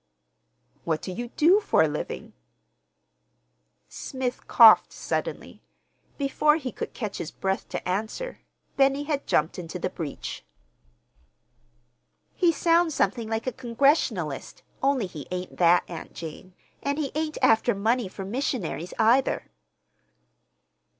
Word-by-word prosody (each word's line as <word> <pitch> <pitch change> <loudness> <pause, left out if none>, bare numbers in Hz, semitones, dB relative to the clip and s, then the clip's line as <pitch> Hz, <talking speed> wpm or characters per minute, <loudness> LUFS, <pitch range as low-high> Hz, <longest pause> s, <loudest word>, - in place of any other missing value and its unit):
"What 160 -2 -1
do 185 - -4
you 240 +6 -5
do 335 - +4
for 410 - +3
a - - +3
living?" 150 0 -5 1.5
Smith 260 -2 -5
coughed 225 -2 +7
suddenly. - - -4 0.6
Before 300 +2 +3
he 265 -6 -4
could - - -6
catch 215 -5 -4
his 160 - -4
breath 190 +1 -3
to - - -5
answer 220 - -3 0.4
Benny 275 +1 +3
had 290 -2 -2
jumped 155 +4 +1
into 170 +1 -6
the 180 - -3
breach. 155 -6 -6 1.9
"He 350 -2 +3
sounds 335 -1 +2
something 230 -3 0
like 225 0 -2
a 255 - 0
Congregationalist, 230 - 0 0.2
only 270 -5 +2
he 155 -7 -9
ain't 180 0 -5
that, 175 0 +5
Aunt 170 -2 -8
Jane, 170 +3 -9 0.3
and 280 +1 -1
he 290 -4 -2
ain't 310 0 -2
after 230 -2 +4
money 225 +3 +1
for 190 +1 -7
missionaries, 200 - -3
either." 240 - +2
230 Hz, 125 wpm, -26 LUFS, 180-280 Hz, 1.9 s, coughed